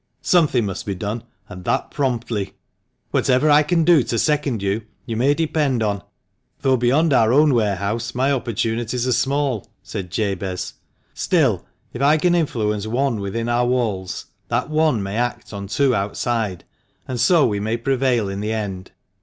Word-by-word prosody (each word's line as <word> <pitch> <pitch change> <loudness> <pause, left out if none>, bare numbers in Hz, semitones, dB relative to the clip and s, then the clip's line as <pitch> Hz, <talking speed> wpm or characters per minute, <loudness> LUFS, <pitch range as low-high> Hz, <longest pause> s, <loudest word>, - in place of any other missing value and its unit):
Something 150 -10 +3
must 95 0 -5
be 100 - -2
done, 105 +4 -4 0.2
and 90 0 -10
that - - 0
promptly." 120 -7 -2 0.6
"Whatever 130 +4 +3
I 145 +1 +7
can 165 +2 +2
do 165 -2 +6
to 115 - -2
second 145 -7 0
you, 100 +3 0 0.2
you 115 - -4
may 135 +6 +3
depend 150 -7 0
on, 100 -2 -1 0.6
though 135 -1 +3
beyond 135 +6 +2
our 115 -3 +4
own 145 +2 +5
warehouse 105 +1 -1
my 130 +3 +2
opportunities 120 -1 -1
are - - +1
small," 135 -2 0 0.2
said 95 -2 -6
Jabez; 95 -2 -2 0.2
" - - -43
still, - - +1 0.3
if 120 - -5
I 145 +3 +5
can 175 +3 +2
influence 110 -11 0
one 120 0 0
within 100 +4 -3
our 120 +1 +2
walls, 110 -7 -1 0.2
that - - -1
one 155 -8 +2
may 100 +2 -4
act 120 -2 -2
on 100 -1 -5
two 135 +5 +2
outside, 105 -1 -1 0.4
and 125 -2 -3
so 155 +5 +5
we 105 -3 0
may 110 +3 -1
prevail 125 -3 +1
in 95 0 -4
the 105 +2 -2
end." 95 -4 -4
120 Hz, 170 wpm, -21 LUFS, 105-135 Hz, 0.6 s, I